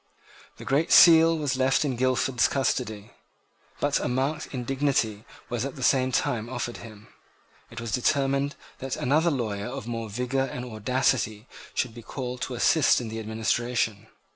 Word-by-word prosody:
The - - -10
Great 145 +4 +1
Seal 165 -1 +7
was 145 -3 -1
left 130 +3 +2
in 135 -3 -1
Guildford's 130 0 +2
custody; 115 -5 -2 0.7
but - - +1
a - - -2
marked 135 +5 -1
indignity 125 -4 -1 0.2
was 120 -1 -3
at 140 0 -5
the 130 - -6
same 130 -1 +3
time 120 -2 -1
offered 120 -1 -4
to - - -10
him. 110 -2 -13 0.6
It 115 - -8
was 115 -1 -5
determined 140 +4 +1 0.2
that 135 0 -4
another 155 +6 +2
lawyer 110 -8 -2
of 135 0 -6
more 115 -2 -4
vigour 125 +5 -1
and 125 -1 -6
audacity 115 -1 -1 0.3
should 125 -3 -1
be 120 - -10
called 125 +1 -6
to 130 - -3
assist 145 +5 +4
in 120 -3 -5
the 110 +1 -5
administration. 110 0 -1
125 Hz, 165 wpm, -26 LUFS, 115-135 Hz, 0.7 s, Seal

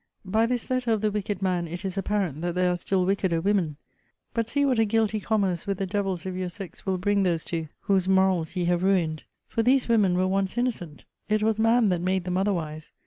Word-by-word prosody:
By 220 +4 +2
this 245 0 -2
letter 250 -3 +1
of 215 - -1
the 215 -1 +1
wicked 205 -1 -3
man 180 -2 0
it 175 +4 -6
is 190 -1 -3
apparent 195 -6 -1
that 175 0 -2
there 180 0 +2
are - - 0
still 185 +1 0
wickeder 190 -3 +1
women. 175 -5 0 0.6
But 230 -1 -1
see 285 +2 +1
what 255 -4 +2
a - - +5
guilty 220 0 +1
commerce 200 -5 0
with 200 -1 -1
the 195 - -1
devils 190 -2 -2
of 185 -1 -4
your 185 -1 -3
sex 195 +1 -10
will 190 -1 +1
bring 200 +2 +1
those 170 -4 +1
to 165 -2 -3
whose 190 -2 +1
morals 190 -3 +2
ye 180 -1 0
have 175 0 +1
ruined! 175 -5 +1 0.3
For 230 - -1
these 255 +3 +3
women 205 -6 +3
were 185 - +2
once 195 +2 -1
innocent: 215 -11 -2 0.3
it 215 0 +2
was 220 0 +1
man 225 0 +4
that 180 -2 0
made 185 0 0
them 180 0 -2
otherwise. 165 -6 -2
190 Hz, 230 wpm, -26 LUFS, 180-215 Hz, 0.6 s, a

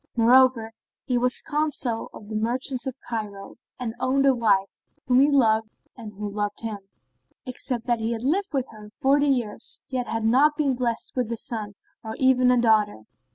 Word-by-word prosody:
Moreover, 240 -1 +4 0.3
he 250 -3 +1
was 250 +1 0
Consul[FN#26] 290 -6 -1
of 205 - -11
the 215 - -6
Merchants 245 +3 -2
of 265 0 -5
Cairo 205 -4 -6 0.2
and 235 -3 -3
owned 270 +2 +1
a 270 - +5
wife, 205 -5 0 0.2
whom 250 0 +4
he 280 +2 +5
loved 220 -6 +3 0.3
and 225 -4 -9
who 205 +1 -5
loved 205 0 -3
him; 220 -3 -4 0.7
except 250 -1 -4
that 240 -2 +1
he 225 +1 -2
had 230 0 -4
lived 375 +8 0
with 270 -4 -1
her 210 -1 -12
forty 280 +6 +2
years, 240 -6 0
yet 255 -2 -2
had 225 0 -2
not 275 +7 +4
been 285 -4 +1
blessed 240 -2 -2
with 245 -3 -1
a 230 - -2
son 215 -3 -4 0.3
or 220 0 -6
even 255 -1 +4
a 250 -1 +4
daughter. 215 - +2
240 Hz, 185 wpm, -24 LUFS, 220-260 Hz, 0.7 s, a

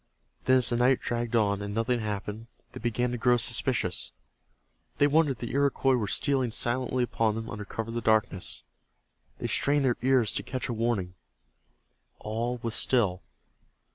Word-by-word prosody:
Then 130 0 +5
as 125 -2 +3
the 120 - +1
night 125 +2 +4
dragged 120 0 -2
on 100 -3 +2
and 100 0 -5
nothing 120 +2 +1
happened, 105 +1 -4 0.2
they - - -8
began 120 +1 -1
to 120 - -3
grow 120 +1 +4
suspicious. 115 -5 -1 0.9
They 145 - +5
wondered 145 0 +3
if - - -14
the 120 - -5
Iroquois 140 -1 +2
were 110 -4 -1
stealing 130 +3 +1
silently 125 +2 0
upon 115 -3 0
them 115 0 -5
under 105 -2 -6
cover 110 +2 -5
of - - -5
the 120 - -2
darkness. 95 - +1 0.7
They - - -6
strained 145 0 +1
their 125 -2 +2
ears 130 -3 +3
to - - -2
catch 130 -4 -4
a - - -2
warning. 110 -6 -1 1.0
All 115 +3 -3
was 115 -1 -2
still. 105 -10 +1
120 Hz, 170 wpm, -28 LUFS, 110-125 Hz, 1.0 s, Then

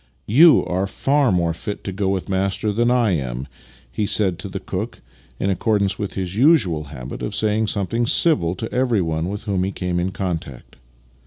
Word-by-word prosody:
" - - -41
Yon 155 +10 +6
are 95 +2 -1
far 135 +4 +1
more 85 -2 +1
fit 100 +5 -6
to 95 - -4
go 95 0 -1
with 95 -2 -1
the - - -7
master 95 +2 0
than 120 +3 +2
I 120 -4 +3
am," 65 -5 -3 0.4
he 105 +7 -1
said 95 -5 +1
to 100 - -6
the 95 +1 -5
cook, 100 +5 -5 0.4
in 100 - 0
accordance 100 0 0
with 100 - -4
his 95 -1 -4
usual 105 - +3
habit 65 -3 -8
of 105 - -4
saying 110 0 +1
something 110 +4 -1
civil 95 - +3
to 110 +4 -6
everyone 95 -10 0
with 105 +1 -5
whom 100 -4 -1
he 95 - -1
came 90 -2 -2
in 90 +2 0
contact. 85 -9 -5
95 Hz, 195 wpm, -21 LUFS, 90-110 Hz, 0.4 s, Yon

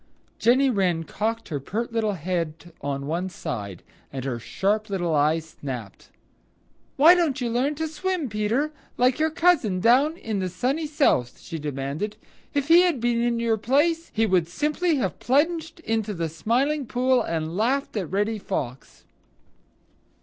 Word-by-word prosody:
Jenny 260 +3 +4
Wren 180 -6 +1
cocked 225 +6 -3
her 145 -4 -2
pert 225 - -4
little 220 -2 +1
head 170 -1 -4
on 140 -1 -3
one 170 +5 -2
side, 100 - -6 0.3
and 135 -1 -5
her 125 -3 -2
sharp 210 - -1
little 175 -4 -1
eyes 155 +2 +1
snapped. 125 -8 -7 0.9
"Why 315 +5 +8
don't 325 -6 +1
you 240 -2 -1
learn 265 +5 +1
to 320 +2 -2
swim, 345 0 -2
Peter, 220 +7 0 0.3
like 250 +2 +3
your 315 +1 +3
cousin 310 - +2
down 270 - +4
in 220 - -3
the 185 -1 -1
Sunny 265 - -1
South?" 275 - +1
she 165 -3 -7
demanded. 145 +7 -3 0.4
"If 285 -1 0
he 335 +2 +8
had 350 -7 +2
been 235 0 +1
in 235 -1 +1
your 230 -1 +1
place, 315 +9 +1
he 225 +1 +1
would 185 -5 +2
simply 300 - 0
have 220 -10 -2
plunged 320 +4 0
into 220 -6 -1
the 165 -1 -2
Smiling 255 - 0
Pool 255 +1 +2
and 165 -3 -3
laughed 255 +7 0
at 190 -7 -2
Reddy 210 +3 0
Fox." 130 -8 -5
225 Hz, 160 wpm, -25 LUFS, 170-280 Hz, 0.9 s, Why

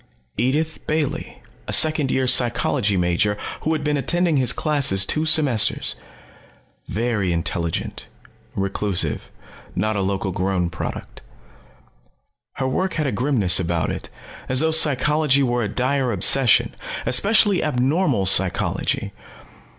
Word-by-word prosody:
Edith 145 +8 -1
Bailey, 155 -2 -3 0.2
a - - -4
second 155 -3 +3
year 130 0 0
psychology 120 -4 +2
major 90 +4 0 0.2
who 160 - -1
had 155 -2 -3
been 150 0 -1
attending 170 +2 0
his 130 -2 +4
classes 140 -11 +1
two 155 +8 -1
semesters. 145 -8 +3 0.9
Very 105 -3 -2
intelligent, 85 0 -3 0.5
reclusive, 100 -1 -2 0.5
not 110 0 -1
a 100 - -1
local 95 0 -2
grown 90 -1 -2
product. 80 - -7 1.3
Her 130 - -3
work 185 +9 -2
had 155 - -2
a 135 - -1
grimness 120 -11 +2
about 85 -2 -2
it, - - -7 0.4
as 130 +1 +3
though 160 0 +1
psychology 150 -2 +3
was 120 -2 -1
a - - -2
dire 125 +3 -1
obsession, 130 0 +4 0.3
especially 205 - +2
abnormal 135 - 0
psychology. 95 -1 +1
125 Hz, 120 wpm, -21 LUFS, 100-150 Hz, 1.3 s, his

